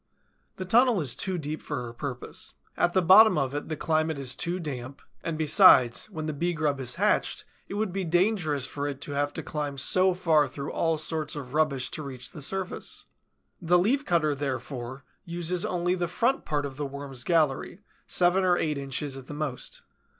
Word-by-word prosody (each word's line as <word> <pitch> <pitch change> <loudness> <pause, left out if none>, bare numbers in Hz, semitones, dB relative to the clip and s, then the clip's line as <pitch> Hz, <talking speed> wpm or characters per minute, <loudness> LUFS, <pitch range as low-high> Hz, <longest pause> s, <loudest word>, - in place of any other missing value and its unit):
The 185 - -5
tunnel 235 +2 +4
is 140 -7 +3
too 190 -2 -2
deep 155 -1 -4
for - - -4
her 120 -1 -7
purpose. 125 0 -4 0.2
At 175 - +1
the 185 - +3
bottom 210 +3 +8
of 135 -2 0
it 145 +2 -4
the 155 - -2
climate 155 -1 0
is 130 -2 0
too 175 +5 -1
damp, 135 -4 -6 0.2
and 165 -2 -3
besides, 135 - +5
when 155 -6 -5
the 155 - -2
Bee 175 +5 -1
grub 150 -4 0
is 130 - -2
hatched, - - +1 0.2
it - - -6
would 210 -3 -1
be 195 0 -2
dangerous 175 - +1
for 145 +1 -4
it 140 -2 -5
to - - -5
have 145 0 0
to - - -5
climb 145 -2 -4
so 185 +6 +3
far 160 -5 +3
through 140 +1 -6
all 165 -1 0
sorts 155 0 -3
of 140 -3 -7
rubbish 145 -4 +1
to 155 - -4
reach 130 -3 -6
the 150 - -10
surface. 190 +6 -3 0.6
The 175 +1 +4
Leaf 240 +11 +2
cutter, 165 - +2
therefore, 130 -2 -5 0.2
uses 175 0 -2
only 175 0 0
the 175 -1 -1
front 240 +9 0
part 145 -1 -1
of 135 -1 -7
the 145 - -2
Worm's 135 -2 -5
gallery, 165 +2 +1 0.3
seven 180 +2 +3
or 180 -1 +3
eight 150 -4 -1
inches 135 0 -2
at 135 -1 -11
the 145 - -7
most. 145 -5 -5
155 Hz, 200 wpm, -27 LUFS, 140-175 Hz, 0.6 s, bottom